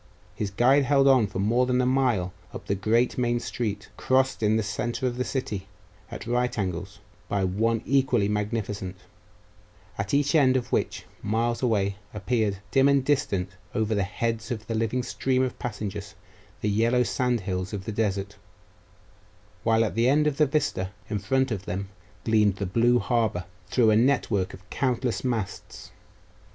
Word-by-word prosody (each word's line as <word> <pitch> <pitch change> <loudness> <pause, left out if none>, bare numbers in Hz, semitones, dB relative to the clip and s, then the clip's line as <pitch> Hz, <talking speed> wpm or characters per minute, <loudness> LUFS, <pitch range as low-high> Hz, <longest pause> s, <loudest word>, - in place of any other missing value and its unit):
His 105 - -3
guide 130 +7 +4
held 140 0 +4
on 130 -5 +5
for 95 - -7
more 115 +6 +2
than 125 0 +2
a 125 - +2
mile 125 -9 +1 0.2
up - - -7
the - - 0
great 110 +6 +1
main 120 -1 +1
street, 105 -4 -4
crossed 130 -1 +1
in 105 0 +3
the 110 - 0
centre 120 +5 -2
of 125 -1 0
the 125 - -1
city, 110 -8 -3 0.4
at - - -7
right 125 +2 0
angles, 90 -4 -3 0.3
by 100 -1 0
one 110 +5 0
equally 130 -6 +2
magnificent, 105 -2 -2 1.0
at 100 0 -2
each 145 +1 +2
end 130 -5 +5
of 120 -1 -4
which, - - -1 0.2
miles 115 +3 0
away, 100 -5 +1 0.2
appeared, 105 -1 0
dim 135 0 +5
and 140 -2 +3
distant 100 -10 0 0.2
over 110 0 +1
the 100 - +1
heads 115 +3 -2
of 110 -4 -4
the 115 - -3
living 115 +3 0
stream 130 +1 0
of 130 - -3
passengers, 105 -3 -5 0.5
the 105 - 0
yellow 115 +4 +3
sand 125 -1 0
hills 90 0 -3
of 100 -2 -5
the - - -3
desert; 100 -2 -2 1.2
while 115 0 +3
at - - -3
the 115 +2 +3
end 150 +2 +3
of 150 -2 0
the 150 - +4
vista 135 -10 0 0.2
in 105 - 0
front 130 +6 +1
of 100 -3 -3
them 95 +2 -4 0.3
gleamed 105 -3 +3
the 100 - -3
blue 120 +6 +3
harbour, 110 -8 0 0.2
through 110 +2 +3
a - - +4
network 110 -6 +2
of 95 +1 -18
countless 125 -2 -1
masts. 115 -7 -4
115 Hz, 170 wpm, -26 LUFS, 100-125 Hz, 1.2 s, on